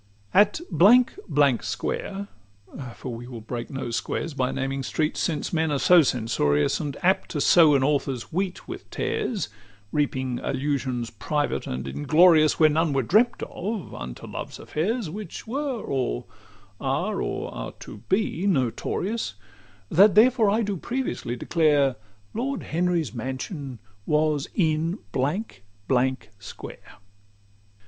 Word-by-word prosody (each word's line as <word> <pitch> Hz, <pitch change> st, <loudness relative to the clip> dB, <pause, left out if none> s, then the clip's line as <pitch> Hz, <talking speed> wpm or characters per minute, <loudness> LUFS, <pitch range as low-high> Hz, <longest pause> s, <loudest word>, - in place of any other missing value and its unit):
XXV 100 Hz, 0 st, -34 dB
At 210 Hz, +10 st, +1 dB
Blank 245 Hz, -, +5 dB
Blank 140 Hz, -5 st, +3 dB
Square; 200 Hz, 0 st, -3 dB, 0.7 s
for 125 Hz, -, -6 dB
we 120 Hz, +1 st, -8 dB
will 125 Hz, -2 st, -7 dB
break 120 Hz, +2 st, -6 dB
no 135 Hz, -3 st, -4 dB
squares 155 Hz, +6 st, -2 dB
By 130 Hz, -2 st, 0 dB
naming 135 Hz, 0 st, -2 dB
streets: 155 Hz, +5 st, -1 dB
since 160 Hz, -1 st, -1 dB
men 160 Hz, -1 st, +1 dB
are 145 Hz, -, +1 dB
so 175 Hz, +5 st, +6 dB
censorious, 110 Hz, -, +1 dB
And 145 Hz, -3 st, -4 dB
apt 190 Hz, +2 st, +2 dB
to 150 Hz, -, -3 dB
sow 155 Hz, 0 st, +6 dB
an 135 Hz, -, +3 dB
author's 135 Hz, -2 st, -1 dB
wheat 185 Hz, +1 st, -2 dB
with -, -, -8 dB
tares, 445 Hz, -, -2 dB, 0.4 s
Reaping 130 Hz, -4 st, -1 dB
allusions 130 Hz, -3 st, -2 dB
private 145 Hz, +7 st, -2 dB
and 65 Hz, +1 st, -4 dB
inglorious, 155 Hz, -, +4 dB
Where 155 Hz, -, +7 dB
none 160 Hz, 0 st, +1 dB
were 135 Hz, -1 st, +1 dB
dreamt 220 Hz, -, +3 dB
of, 205 Hz, +1 st, -5 dB
unto -, -, -7 dB
love's -, -, -6 dB
affairs, 210 Hz, +7 st, -2 dB
Which 205 Hz, -1 st, -7 dB
were, 265 Hz, +1 st, -2 dB
or 130 Hz, -, -2 dB, 0.5 s
are, -, -, -1 dB
or -, -, -3 dB
are -, -, -6 dB
to -, -, -9 dB
be 195 Hz, -1 st, +1 dB
notorious, 175 Hz, -, -1 dB, 0.6 s
That 195 Hz, +4 st, +6 dB
therefore 225 Hz, -1 st, +5 dB
do 205 Hz, -2 st, -2 dB
I -, -, -11 dB
previously 240 Hz, -, -3 dB
declare, 145 Hz, -2 st, +2 dB, 0.4 s
Lord 265 Hz, +5 st, -2 dB
Henry's 170 Hz, -, 0 dB
mansion 130 Hz, -, -5 dB, 0.3 s
was 150 Hz, -2 st, +1 dB
in 165 Hz, 0 st, +1 dB
Blank 140 Hz, -, -2 dB, 0.2 s
Blank 130 Hz, -3 st, 0 dB
Square. 105 Hz, -, -10 dB
150 Hz, 140 wpm, -25 LUFS, 130-195 Hz, 0.7 s, Where